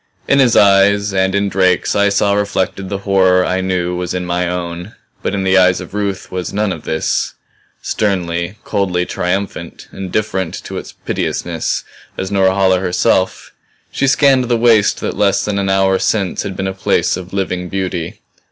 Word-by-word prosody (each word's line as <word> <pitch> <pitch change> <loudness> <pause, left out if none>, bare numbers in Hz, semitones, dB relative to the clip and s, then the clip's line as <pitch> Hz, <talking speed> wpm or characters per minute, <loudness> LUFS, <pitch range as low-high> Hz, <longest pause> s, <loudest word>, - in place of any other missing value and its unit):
In 140 - +3
his 125 -4 +4
eyes 100 0 +4
and 95 0 +1
in 100 0 +1
Drake's 95 -2 +1
I 100 0 +3
saw 100 0 +2
reflected 100 -1 -1
the 100 - -2
horror 95 -2 +3
I 95 +1 0
knew 90 -1 -1
was 90 0 -3
in 90 -1 -2
my 90 0 -1
own. 90 +2 -5 0.3
But - - -2
in 95 - -1
the 95 0 +4
eyes 90 0 +4
of - - -9
Ruth 100 -2 -3
was 90 -1 -4
none 105 0 0
of 80 - -10
this 80 - -1 0.5
sternly, 90 -3 -1
coldly 95 -4 -1
triumphant, 90 -2 -3
indifferent 95 -1 -2
to - - -5
its - - -10
piteousness - - -3 0.3
as 95 +1 -4
Norhala 95 -1 +3
herself, 95 0 0 0.4
she 135 - 0
scanned 135 -2 +4
the 120 -1 +1
waste 115 -3 +3
that - - -3
less 100 -1 +2
than 100 -1 -1
an 95 -1 -1
hour 95 0 +2
since 100 -4 0
had 95 - -5
been 95 - -2
a 95 - -2
place 95 - +1
of 90 -1 -8
living 90 -2 -2
beauty. 90 -3 -4
95 Hz, 175 wpm, -16 LUFS, 90-100 Hz, 0.5 s, his